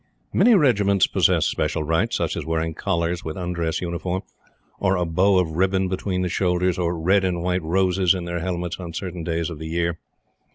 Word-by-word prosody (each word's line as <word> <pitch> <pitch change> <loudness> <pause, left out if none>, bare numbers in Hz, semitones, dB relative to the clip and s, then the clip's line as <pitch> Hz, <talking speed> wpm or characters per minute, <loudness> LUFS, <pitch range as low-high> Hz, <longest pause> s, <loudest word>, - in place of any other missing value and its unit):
Many 230 +4 +5
Regiments 105 - +3
possess - - +2
special 75 +1 -1
rights, 80 +2 0
such - - -1
as - - -3
wearing 80 +1 -1
collars 85 -1 -1
with 80 -1 -5
undress 85 -2 -2
uniform, 90 +1 -3 0.6
or 95 -1 +2
a 90 -1 0
bow 95 +4 +3
of 90 -3 +1
ribbon 95 +3 +1
between 95 0 -2
the - - 0
shoulders, 90 0 0
or 85 -1 0
red 95 +4 +3
and 90 -2 -1
white 90 0 0
roses 90 +2 +2
in 90 -2 -4
their 85 0 -3
helmets 90 0 -3
on 85 -2 -7
certain 90 -1 -5
days 85 +1 -2
of 80 - -7
the 80 - -6
year. 85 +1 -1
90 Hz, 195 wpm, -23 LUFS, 85-95 Hz, 0.6 s, Many